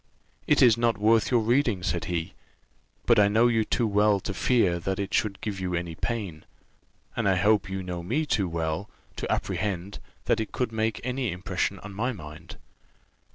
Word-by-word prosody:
"It - - +5
is 115 -2 +6
not 115 -2 +2
worth 110 +2 +3
your 120 -3 +3
reading," 115 -4 +1
said 85 -3 -1
he; 85 -1 -3 0.7
"but 120 -2 +5
I 100 - +6
know 110 +3 +3
you 115 -2 +2
too 120 +2 0
well 105 -1 +3
to 100 - -4
fear 95 -5 +2
that 95 +2 -2
it 100 -1 -4
should 105 -3 0
give 105 -3 -4
you 90 -1 -2
any 85 -1 -3
pain; 95 -4 -4 0.7
and - - +1
I 95 - +3
hope 100 +1 +2
you 95 0 -4
know 90 -1 -4
me 125 - -1
too 100 -10 0
well, 80 +4 -2 0.3
to - - -3
apprehend 95 0 -2 0.3
that - - +2
it 110 - -3
could 125 -3 -2
make 110 0 -1
any 125 -1 -1
impression 90 +2 -2
on 100 0 -9
my 120 +6 -1
mind." 80 -3 -10
100 Hz, 190 wpm, -27 LUFS, 90-115 Hz, 0.7 s, is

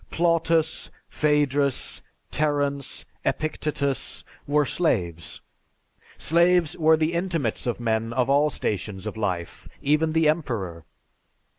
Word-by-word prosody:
Plautus, 165 -1 +1 0.2
Phædrus, 145 -3 +1 0.3
Terence, 145 -2 -1 0.2
Epictetus, 150 -3 -2 0.2
were 145 +1 +3
slaves. 85 - -1 0.8
Slaves 170 0 +3
were 160 -1 +4
the 155 +1 0
intimates 170 - -1
of 120 - -1
men 115 -1 0
of 125 +1 +1
all 145 +2 +4
stations 100 -5 -3
of 110 - -4
life, 90 -6 -3
even 155 +2 +2
the 160 -1 +3
emperor. 110 - -1
145 Hz, 105 wpm, -25 LUFS, 115-160 Hz, 0.8 s, were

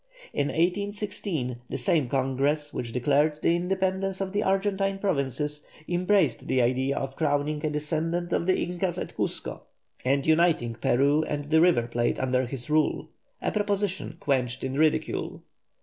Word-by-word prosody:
In 140 - +1
1816 185 - -1
that - - -3
same 150 -7 +1
Congress 140 +3 0
which 120 -2 -4
declared 145 +5 +2
the 170 - +4
independence 190 +1 -1
of 195 0 -3
the 205 - +1
Argentine 195 0 +1
Provinces, 150 -5 -1 0.2
embraced 185 +3 +2
the 130 - +2
idea 130 +3 +1
of 135 0 -3
crowning 150 -1 0
a 155 - +1
descendant 165 +3 -1
of 170 - 0
the 185 - +3
Incas 175 0 -2
at - - -5
Cuzco, - - -3 0.4
and 135 +2 +1
uniting 160 -7 +3
Peru 140 +6 +2
and 145 0 -4
the 160 0 +6
River 165 -10 +4
Plate 120 0 0
under 130 -1 +1
his 125 -1 -6
rule, 155 0 +1 0.3
a - - +1
proposition 200 -5 -1
quenched 130 -4 0
in 130 0 -2
ridicule. 155 +2 0
155 Hz, 150 wpm, -27 LUFS, 135-185 Hz, 0.4 s, the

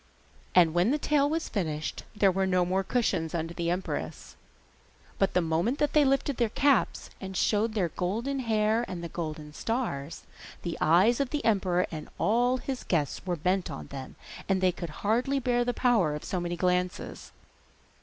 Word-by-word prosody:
And 170 -3 +6
when 175 +5 +3
the 290 - +2
tale 290 -1 +2
was 320 +1 -1
finished 155 -6 -3
there 200 -2 +4
were 190 +1 0
no 180 -1 +2
more 190 +2 0
cushions 185 -8 0
under 165 0 -2
the 170 0 -2
empress, 180 +2 -4 0.8
but 195 - +1
the 180 - +4
moment 165 - 0
that 295 -1 0
they 300 - +6
lifted 275 0 +1
their 235 -3 +2
caps, 275 0 +1
and 190 -1 -5
showed 215 +3 +1
their 185 -5 +1
golden 230 - -2
hair 220 -1 +1
and 180 -2 -6
the 170 - -5
golden 155 -3 -5
stars, 170 - -3 0.4
the 170 -1 -3
eyes 185 - +4
of 280 -3 0
the 295 +1 -3
emperor 185 -5 +2
and 155 -2 -6
of - - -22
all 245 +4 +2
his 260 0 -5
guests 150 -6 -1
were 175 - +1
bent 180 +3 0
on 75 - -6
them, 135 -1 -7 0.3
and 195 -1 +3
they 185 -1 +3
could 170 -1 -6 0.2
hardly 245 +6 +2
bear 245 -2 +1
the 245 - 0
power 225 - +2
of 150 - -6
so 185 - -2
many 175 0 -3
glances. 180 0 -1
190 Hz, 185 wpm, -28 LUFS, 170-240 Hz, 0.8 s, And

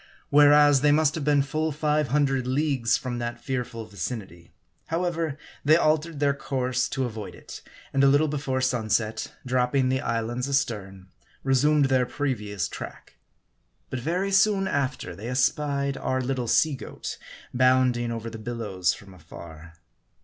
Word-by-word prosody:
Whereas, 145 -1 +6
they 145 0 +4
must 150 0 +3
have 160 -3 -4
been 145 -1 +3
full 155 +3 -1
five 150 0 0
hundred 135 -1 +1
leagues 130 -3 +1
from 125 -2 -4
that 120 0 -4
fearful 120 -2 -4
vicinity. 95 -4 -7 0.4
However, 165 -3 -1 0.3
they 155 +2 +6
altered 155 -1 +1
their 145 -1 +3
course 130 -2 -1
to 135 -1 -1
avoid 110 -3 -6
it; - - -11 0.3
and 135 - +3
a - - +7
little 145 +3 +4
before 135 -3 -2
sunset, 110 -3 0
dropping 130 +1 +1
the 130 0 0
islands 120 +3 -2
astern, 100 -9 -2 0.3
resumed 140 +2 +3
their 130 -2 +2
previous 105 -10 -2
track. - - -9 0.7
But 130 - -2
very 180 +9 -1
soon 195 0 +3
after, 130 - -2
they 105 +6 -8
espied 140 +2 0
our 130 -1 -1
little 130 -1 -2
sea 155 +6 +3
goat, 130 - -7 0.3
bounding 125 -1 +3
over 115 0 -5
the 110 - -8
bil 120 +2 -5
lows 95 -6 -1
from 100 -2 -14
afar. 85 -1 -12
130 Hz, 150 wpm, -26 LUFS, 115-145 Hz, 0.7 s, a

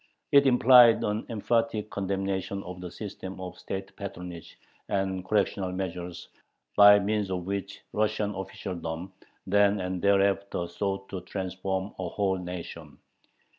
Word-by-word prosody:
It 140 -1 +6
implied 125 -3 +7
an 105 +2 -2
emphatic 115 -1 0
condemnation 95 0 -2
of 90 0 -8
the 90 - -6
system 95 -1 -7
of 90 -1 -7
state 95 0 -6
patronage 90 -4 -8 0.3
and 95 -2 -1
"correctional 95 -1 0
measures" 90 -2 -5 0.5
by 105 0 +9
means 105 0 0
of 90 -2 -3
which 100 +1 -4
Russian 105 -1 0
officialdom 90 -2 -5 0.3
then 100 +1 +3
and 90 -1 -3
thereafter 100 -2 +2
sought 95 +2 -3
to 95 - -5
"transform" 95 +1 -3
a 90 -2 -2
whole 95 0 0
nation. 85 -4 -7
95 Hz, 130 wpm, -28 LUFS, 90-100 Hz, 0.5 s, by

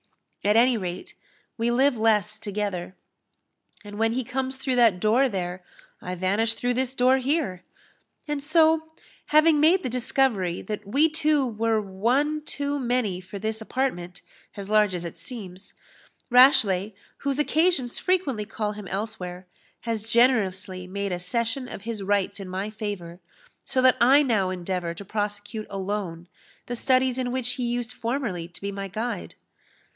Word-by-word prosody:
At 210 +1 +3
any 245 +2 +5
rate, 180 -3 -5 0.5
we 230 +1 +1
live 260 +3 +3
less 215 -1 +1
together; 200 -4 -3 0.9
and 205 0 -9
when 225 0 +2
he 255 +1 -1
comes 265 +2 -3
through 260 -1 -1
that 225 -7 +5
door 235 +7 +3
there, 180 -3 -4 0.4
I 180 0 -4
vanish 200 +5 +1
through 245 0 0
this 260 +1 -2
door 255 +1 +4
here; 260 - -1 0.7
and 295 -1 -2
so, 315 +1 +3 0.4
having 305 0 +5
made 340 +5 +4
the - - -2
discovery 235 -7 0
that 210 -1 -5
we 280 +9 +4
two 305 -3 +2
were 225 -1 0
one 245 +10 0
too 285 -1 -2
many 240 -7 0
for 190 +2 -9
this 220 +2 -3
apartment, 215 -8 -3 0.3
as 200 0 -6
large 210 -3 +4
as 175 -1 -4
it 170 - -6
seems, 195 -7 -9 0.6
Rashleigh, 220 -6 +5 0.2
whose 280 -1 -2
occasions 300 -4 +1
frequently 295 - 0
call 210 0 -3
him 210 -2 -8
elsewhere, 185 -2 -4 0.4
has 225 -2 -3
generously 195 -7 +2
made 200 +1 -3
a 175 - -2
cession 235 +7 -1
of 195 - -7
his 225 -2 -4
rights 200 +1 0
in 195 -2 -7
my 190 +3 -3
favour; 200 -5 -6 0.4
so 260 - 0
that 255 -1 +6
I 270 +5 +6
now 215 -8 +1
endeavour 180 -2 -3
to 200 - -9
prosecute 205 +1 -4
alone 190 -3 -4 0.4
the 245 - -4
studies 255 +1 +2
in 250 -1 -1
which 250 -1 -1
he 250 -1 -3
used 240 0 -2
formerly 230 -10 -3
to 170 - -10
be 200 0 -3
my 195 0 -5
guide." 220 +5 -4
220 Hz, 160 wpm, -25 LUFS, 195-260 Hz, 0.9 s, that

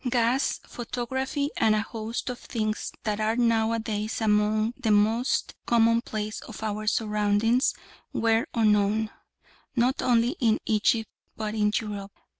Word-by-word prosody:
Gas, 245 +2 +1
photography, 260 +4 -3
and 215 -1 +4
a 215 - +1
host 225 +2 -4
of 245 - -8
things 215 -2 -3
that 210 -1 -1
are 215 +1 +1
now 230 -2 +2
a 230 - +1
days 215 -1 -3
among 215 +1 +2
the 255 -5 -2
most 220 +5 +2
commonplace 230 -2 +1
of 220 - -9
our 215 0 -3
surroundings 210 +3 +2 0.4
were 225 0 +1
unknown, 215 -1 +2 0.6
not 250 +2 +2
only 240 +3 +2
in 225 -4 +3
Egypt 220 +1 +1 0.3
but 215 -1 -3
in 210 -1 +2
Europe. 205 -2 -6
220 Hz, 135 wpm, -26 LUFS, 215-235 Hz, 0.6 s, and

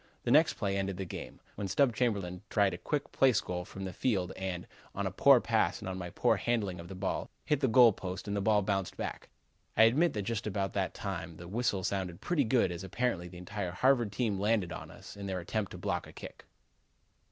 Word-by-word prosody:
The 120 - 0
next 155 +4 +5
play 100 -2 -1
ended 95 -1 -2
the 95 - -3
game, 85 - -8
when 100 -1 -4
Stub 120 +5 +2
Chamberlin 100 -7 -1
tried 100 -3 +3
a - - -4
quick 145 -2 -2
place 130 -5 +4
goal 90 0 -4
from 95 +1 -7
the 95 - -5
field 95 -4 0
and, 95 -2 -4 0.3
on - - -2
a - - -1
poor - - +6
pass - - +1
and - - -7
on 95 0 -4
my 90 -1 -5
poor - - +2
handling 105 -7 -1
of 85 - -8
the 95 - -8
ball, 90 - -2 0.2
hit 150 -3 +2
the 135 - +2
goal 120 -1 +7
post 95 +1 -6
and 100 - -1
the 100 - 0
ball 105 0 +3
bounded 95 -2 -1
back. - - -5 0.5
I - - +8
admit 145 +10 +4
that 105 - -2
just 110 +1 -2
about 95 -2 -2
that 95 -2 -1
time 85 -5 -5
the 85 - -9
whistle 100 -1 0
sounded 95 -2 -2
pretty 165 -6 +1
good 115 -5 +3
as 85 +1 -5
apparently 95 -2 -1
the 90 0 -11
entire 90 0 -4
Harvard 120 0 +3
team 105 -2 -1
landed 105 -3 +1
on - - -8
us - - -11
in 100 -1 -6
their 95 -1 -2
attempt 100 +4 -2
to - - -7
block 90 -1 -2
a - - -13
kick." - - -10
100 Hz, 230 wpm, -31 LUFS, 90-115 Hz, 0.5 s, I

